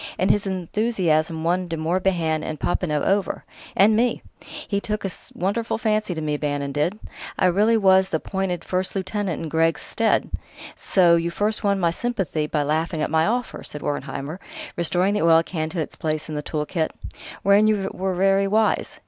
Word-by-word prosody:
And 185 0 +3
his 205 0 0
enthusiasm 175 -4 0
won 180 +2 +1
De 165 -1 -3
Morbihan 165 -1 0
and 155 - -5
Popinot 150 -5 0
over... 195 0 0 0.3
and 210 +3 +5
me! 240 +2 +1 0.4
He 200 -1 -1
took 210 0 -3
a 195 - -1 0.2
wonderful 205 +6 -1
fancy 215 -4 0
to 160 - -4
me, 150 -1 -1
Bannon 145 -1 -2
did; 150 +8 0 0.4
I - - +2
really 210 +6 +4
was 190 -2 +4
appointed 180 +1 -2
first 185 +1 -1
lieutenant 190 -3 -2
in - - -3
Greggs' 165 +1 +1
stead.... 225 -1 +1 0.4
So 175 -3 +4
you 170 0 -1
first 210 +5 -1
won 200 -1 +2
my 170 -2 +2
sympathy 185 -8 -2
by 150 -1 0
laughing 155 +2 -1
at - - -2
my 160 0 +3
offer," 245 +2 -2
said 150 - -8
Wertheimer, 145 +2 -4 0.4
restoring 175 +3 +2
the 210 - 0
oil 165 0 +5
can 160 -2 -3
to 175 - -4
its 155 - -3
place 155 -1 -2
in 155 - -6
the 150 - -2
tool 150 0 -3
kit; 160 0 -2 0.5
"wherein 200 +2 +5
you 200 -3 +1
were 190 0 -2
very 195 +1 +3
wise.... 215 +2 +1
180 Hz, 180 wpm, -23 LUFS, 160-200 Hz, 0.5 s, and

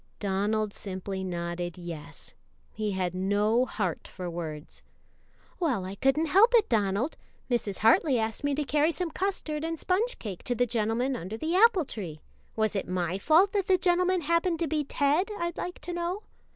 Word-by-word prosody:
Donald 205 +2 0
simply 190 0 -5
nodded 175 -1 -4
yes; 170 -4 -8 0.4
he 215 -2 -2
had 185 -2 -1
no 205 +6 +2
heart 185 -6 -3
for 185 -1 -7
words. 155 -3 -6 0.8
"Well, 260 - 0
I 190 - -5
couldn't 270 +9 +2
help 410 +10 +5
it, 445 -3 +5
Donald; 215 +5 0 0.3
Mrs. 210 -5 0
Hartley 245 +5 +4
asked 220 +2 -2
me 285 -1 +1
to 300 - 0
carry 295 +4 +2
some 345 0 -2
custard 315 -5 -2
and 330 0 -2
sponge 425 +10 0
cake 195 -5 -6
to 245 - 0
the 245 - +2
gentleman 235 +3 0
under 195 +2 -5
the 320 +8 -1
apple 395 -5 +5
tree 175 -11 -6 0.4
was 220 -1 0
it 195 - -2
my 180 0 -1
fault 330 - +5
that 400 -3 0
the 375 - +5
gentleman 365 0 +2
happened 335 +2 +1
to 335 0 -1
be 300 0 0
Ted, 290 +7 +1
I'd 340 0 -3
like 360 - -4
to 355 - -5
know?" 345 +4 -3
245 Hz, 180 wpm, -28 LUFS, -, 0.8 s, help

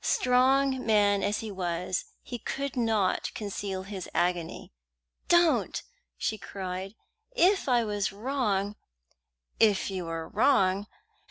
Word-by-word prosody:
Strong 260 +1 +3
man 205 -2 +3
as 205 +1 0
he 220 -2 -5
was, 180 -1 -2 0.2
he 245 - -6
could 275 +3 -4
not 220 -6 +1
conceal 200 -2 -4
his 190 -2 -7
agony. 175 - -1 0.5
"Don't!" 345 -1 +3 0.3
she 215 - -2
cried. 190 +1 -6 0.4
"If 390 - +3
I 240 -2 +4
was 205 -3 -1
wrong 210 -3 -1 0.4
" 65 +1 -58 0.3
"If 205 -3 +3
you 185 -2 -3
were 165 -1 -4
wrong!" 200 -4 +2
205 Hz, 120 wpm, -28 LUFS, 190-245 Hz, 0.5 s, I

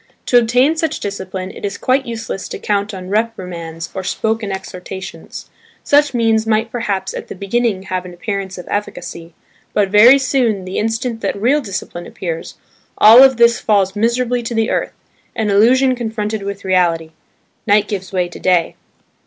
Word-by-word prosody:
To 245 - +5
obtain 250 +6 +2
such 320 0 -2
discipline 190 -2 -5
it - - -12
is 200 -1 -3
quite 260 +1 +1
useless 225 -4 -5
to - - -5
count 205 0 -1
on 185 -2 -8
reprimands 180 -7 -3
or 190 - -4
spoken 220 +1 -2
exhortations. 190 0 -8 0.3
Such 290 -2 +3
means 225 -1 +2
might 220 +1 +1
perhaps 205 -5 -2
at - - -6
the - - -8
beginning 200 0 -1
have 185 -1 -3
an 180 - -9
appearance 195 +1 -5
of 180 - -9
efficacy: 170 -5 -5 0.4
but 200 -2 +2
very 225 +7 +7
soon, 245 -8 0
the 185 - -3
instant 225 +1 -2
that - - -2
real 265 +8 +2
discipline 190 -5 -6
appears, 165 -3 -6 0.4
all 225 +4 +9
of 265 -2 +6
this 235 0 +4
falls 195 -2 +1
miserably 240 +3 0
to 235 0 -5
the 225 0 +1
earth, - - -1 0.4
an 215 -2 0
illusion 255 +6 +4
confronted 220 -3 -3
with 200 0 -6
reality–"night 180 +3 -1
gives 190 -3 -5
way 180 -2 0
to 175 - -11
day." 180 -3 +1
210 Hz, 165 wpm, -17 LUFS, 190-235 Hz, 0.4 s, all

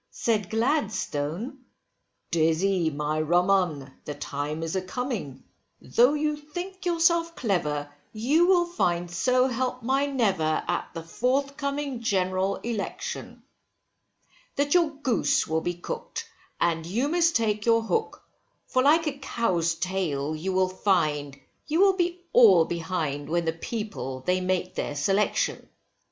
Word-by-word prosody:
Said 210 -5 -1
Gladstone, 225 - -1 0.7
Dizzy 170 +2 +2
my 150 +1 -1
rum 175 +4 +2
'un, 155 -9 0
the 150 - -6
time 150 +3 -4
is 165 +2 -3
a 190 - +1
coming, 215 - -4 0.4
though 245 - +3
you 300 0 0
think 355 +6 -7
yourself 335 0 +2
clever, 150 - -1 0.2
you 280 +11 +2
will 360 -2 +4
find 175 - -1
so 250 +9 +2
help 250 0 -2
my 270 +4 +1
never, 195 - +1
at - - -1
the 165 - -5
forthcoming 280 - -1
general 190 -2 0
election, 230 -3 -5 1.1
That 285 0 +1
your 345 -3 +4
goose 280 -5 +1
will 160 +1 -1
be 175 +1 -2
cooked, 175 - -6 0.3
and 165 -1 +1
you 220 - -1
must 335 +1 +2
take 215 -1 0
your 230 -1 +4
hook, 445 - -2 0.4
for 255 - +1
like 310 +5 +4
a 280 -2 -3
cow's 180 -11 0
tail 160 -6 -2
you 175 +5 -3
will 185 0 +2
find, 155 -7 0 0.3
you 315 +2 0
will 390 0 +6
be 355 -1 -1
all 195 -9 +7
behind, 160 -4 -3
when 170 +1 0
the 160 - 0
people 165 - -5
they 180 +6 0
make 185 0 -1
their 145 - -3
selection. 195 +8 0
195 Hz, 140 wpm, -26 LUFS, 165-275 Hz, 1.1 s, all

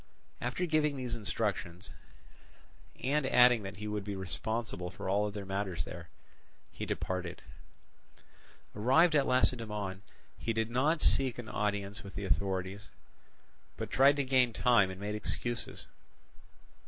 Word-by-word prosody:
After 125 +9 -1
giving 155 -3 +1
these 125 -2 -3
instructions, 105 -5 -3 1.1
and 145 +3 +2
adding 125 -2 +6
that 95 -2 -7
he 105 +1 -5
would 105 -1 -2
be 100 0 -4
responsible 95 0 -3
for 90 - -7
all 100 +2 +2
other 105 -1 -5
matters 95 -4 -2
there, 85 -2 -9 0.6
he - - -6
departed. 90 -1 -3 1.3
Arrived 135 +11 +4
at 140 -2 +3
Lacedaemon 105 -6 0 0.4
he 115 - -1
did 110 +1 -1
not 150 +6 +2
seek 130 -3 +3
an 120 -3 -7
audience 100 -1 -2
with 100 -1 -11
the 100 - -3
authorities, 95 +1 -1 0.9
but - - -5
tried 140 +2 +6
to 140 - 0
gain 130 -3 +3
time 115 -6 +4
and 95 0 -7
made 105 +1 -3
excuses. 120 +2 -3
105 Hz, 135 wpm, -32 LUFS, 100-125 Hz, 1.3 s, adding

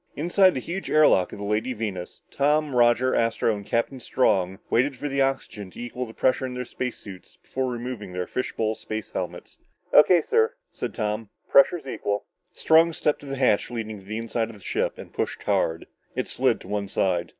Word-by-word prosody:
Inside 180 +4 +4
the - - 0
huge 175 +9 -5
air 155 0 +6
lock 90 -1 +3
of - - -8
the 100 - -5
Lady 105 +5 0
Venus, 105 -6 -5
Tom, 150 0 +1
Roger, 120 +1 +4
Astro 115 -1 +1
and 100 - -7
Captain 115 +5 -1
Strong 95 -7 +1
waited 130 +2 +2
for 145 - -3
the 140 -1 0
oxygen 135 -7 -2
to - - -13
equal 120 +1 -4
the 110 - -11
pressure 130 0 +2
in 130 -1 -4
their 125 0 -4
space 125 +1 -4
suits 95 -3 -11
before 130 -1 -3
removing 120 -5 -5
their 90 0 -3
fish 130 - -3
bowl 110 -1 -1
space 110 0 -6
helmets. - - -6 0.3
"O.K., 170 +2 +7
sir," 455 +2 +2 0.2
said - - -5
Tom, 110 -1 -2 0.2
"pressure's 140 +3 +5
equal." 105 -5 -3 0.3
Strong 165 0 +4
stepped 150 -1 0
to 145 - -12
the 135 - -3
hatch 125 -6 +2
leading 110 -3 -5
to 95 - -17
the 110 +1 -4
inside 115 0 -2
of 115 - -10
the - - -14
ship - - -2
and - - -11
pushed - - -3
hard. 80 0 0 0.3
It - - -2
slid - - +1
to - - -12
one 105 -1 -2
side. 90 -3 0
120 Hz, 205 wpm, -25 LUFS, 105-135 Hz, 0.3 s, O.K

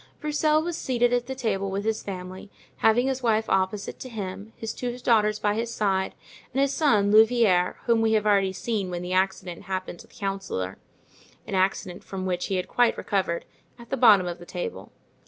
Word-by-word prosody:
Broussel 305 +1 +2
was 345 -1 -3
seated 245 -1 +1
at 245 -1 0
the 265 - -4
table 200 -6 -1
with 200 +2 -3
his 220 0 0
family, 185 0 -7 0.3
having 225 +3 +3
his 265 -1 -1
wife 220 -2 +1
opposite 190 +1 -1
to 255 - -7
him, 205 -1 -6
his 225 - -4
two 245 -1 -4
daughters 215 -4 +2
by 210 -1 +1
his 230 +2 -2
side, 195 -4 0 0.4
and 265 - -2
his 275 0 +2
son, 215 -10 +3
Louvieres, 220 -5 +4
whom 230 -2 +3
we 220 0 +2
have 215 -1 +2
already 200 -2 +3
seen 200 0 -2
when 175 0 -4
the 180 +1 -3
accident 185 -2 -1
happened 185 -2 -4
to - - -13
the - - -25
councillor—an 195 - -7
accident 185 -1 0
from 190 -1 -5
which 180 -1 -1
he 195 - -1
had 180 - -2
quite 245 -1 +2
recovered—at 200 +5 -4
the - - +2
bottom 215 -7 +6
of 175 -1 -4
the 175 - -11
table. 95 - -6
205 Hz, 190 wpm, -26 LUFS, 190-235 Hz, 0.4 s, bottom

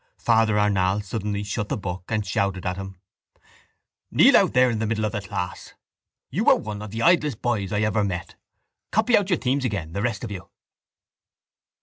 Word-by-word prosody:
Father 110 -2 +2
Arnall 100 -1 +1
suddenly 105 0 -3
shut 105 +1 -3
the - - -1
book 90 -2 -5
and 110 -2 -1
shouted 95 -1 -1
at 90 0 -1
him: 95 -1 -8 1.1
—Kneel - - +6
out - - +4
there 125 0 +4
in 110 - -2
the 110 - -1
middle 110 0 -1
of 105 - -1
the 105 - -3
class. 90 -2 -6 0.6
You - - +2
are - - +7
one 105 -1 -6
of 105 - -7
the 115 +3 -4
idlest 150 - +2
boys 110 -6 -1
I 105 0 0
ever 105 0 +1
met. 90 -3 -4 0.6
Copy 225 +3 +3
out 200 -1 +2
your 180 - +2
themes 130 +1 0
again 100 -10 -3
the 100 - -2
rest 115 -1 -2
of 115 - -5
you. 95 -3 -8
105 Hz, 195 wpm, -24 LUFS, 100-115 Hz, 1.1 s, are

